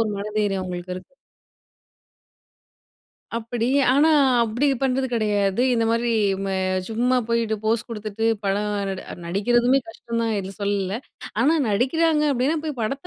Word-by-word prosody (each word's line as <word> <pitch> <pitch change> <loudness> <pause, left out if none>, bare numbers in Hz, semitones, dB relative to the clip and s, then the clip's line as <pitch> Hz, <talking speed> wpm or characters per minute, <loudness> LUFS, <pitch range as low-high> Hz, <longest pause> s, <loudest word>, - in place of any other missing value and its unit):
ஒரு 220 - -1
மன 200 - -4
தைரியம் 195 -3 0
அவுங்களுக்கு 180 0 -5
இருக்கு. 185 +7 -12 2.2
அப்பிடி 230 0 -2 0.3
ஆனா, 295 +3 +5 0.4
அப்படி 235 +6 0 0.2
பண்றது 265 0 +1
கிடையாது. 210 -2 +1
இந்த 230 -1 +1
மாதிரி 230 +1 +1 0.4
ம - - -3 0.4
சும்மா 245 +3 +1
போயிட்டு 230 -2 0
போஸ் 225 +2 +1
கொடுத்துட்டு, 215 -1 -4 0.2
படம் 200 +1 0 0.2
நட 190 -1 -4 0.2
நடிக்கிறதுமே 240 +8 +2
கஷ்டம் 230 +1 -4
தான். 225 -1 0
இல்ல 190 0 -7
சொல்லல. 200 0 -1 0.4
ஆனா, 290 +7 +4
நடிக்கிறாங்க 300 +9 +2
அப்பிடின்னா 275 +4 +1
போய் 300 -5 -4
படத்த 275 +9 -3
225 Hz, 135 wpm, -23 LUFS, 200-250 Hz, 2.2 s, ஆனா